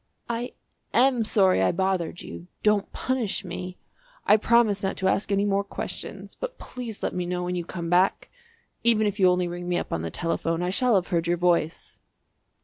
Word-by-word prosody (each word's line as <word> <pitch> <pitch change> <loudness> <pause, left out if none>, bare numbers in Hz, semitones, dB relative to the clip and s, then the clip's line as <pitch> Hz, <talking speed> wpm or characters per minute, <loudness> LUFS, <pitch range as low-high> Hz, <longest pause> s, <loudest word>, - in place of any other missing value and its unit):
"I 235 +1 -3 0.4
am 250 -2 +4
sorry 195 - +3
I 95 - +3
bothered 185 -2 -1
you; 85 +1 -9 0.2
don't 210 -2 +2
punish 240 -6 -2
me. 180 0 -6 0.5
I 210 - +7
promise 220 -2 +3
not 190 - -2
to 190 - 0
ask 200 +2 +1
any 200 0 +2
more 200 0 +1
questions, 200 - -7
but - - -6
please 240 -4 -8
let - - -1
me 180 -1 -2
know 180 0 -2
when 180 0 -2
you 175 -1 -2
come 170 0 -5
back. 180 +2 +2 0.5
Even 225 -2 +4
if 205 0 -1
you 185 -1 +6
only 180 0 +1
ring 175 0 -5
me 175 - +1
up - - -3
on 85 - -1
the 85 - -3
telephone 165 - -1
I 180 - 0
shall 245 +3 +2
have 185 -2 +1
heard 170 -2 0
your 175 0 +2
voice!" 170 -2 0
190 Hz, 200 wpm, -26 LUFS, 175-215 Hz, 0.5 s, I